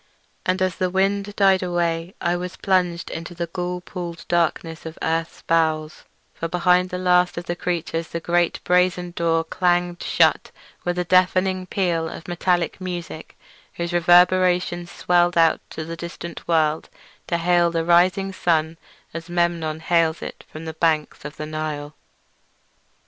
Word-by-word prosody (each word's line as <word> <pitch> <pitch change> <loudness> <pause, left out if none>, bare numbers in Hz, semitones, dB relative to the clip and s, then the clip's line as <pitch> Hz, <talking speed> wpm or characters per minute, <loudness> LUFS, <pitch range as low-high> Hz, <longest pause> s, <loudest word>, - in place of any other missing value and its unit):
And 185 +1 +1
as 185 -2 -1
the 185 - 0
wind 200 +2 0
died 195 -2 +4
away 175 0 -1
I 175 0 0
was 180 +1 -5
plunged 180 -3 0
into 170 +2 -6
the 170 0 -2
ghoul 180 +1 -4
peopled 175 -2 -7
blackness 165 -1 0
of 160 - -9
earth's 165 +1 -2
bowels; 155 -2 0 0.3
for 165 - -4
behind 180 +1 +2
the 180 - -4
last 180 -1 +2
of 175 - -4
the 175 - -2
creatures 170 -2 -2
the 170 - -4
great 175 0 0
brazen 180 0 +2
door 165 -1 +1
clanged 175 +1 0
shut - - +2 0.3
with 175 0 -2
a 180 - +1
deafening 185 +1 +2
peal 170 -4 0
of 165 - -9
metallic 175 0 0
music 175 -3 -6 0.4
whose 170 0 -3
reverberations 175 0 +3
swelled 175 0 +2
out 165 -1 +4
to 160 - -6
the 165 +1 -6
distant 170 0 -8
world 155 -2 +1 0.4
to 170 - 0
hail 175 0 +3
the 165 -1 -1
rising 185 +3 +3
sun 160 -2 0 0.3
as 165 +1 -7
Memnon 170 -2 0
hails 165 -1 +1
it - - -8
from 155 +1 -8
the 160 - -5
banks 155 -3 0
of 150 0 -8
the 155 - -4
Nile. 155 -1 -4
175 Hz, 155 wpm, -22 LUFS, 165-180 Hz, 0.4 s, died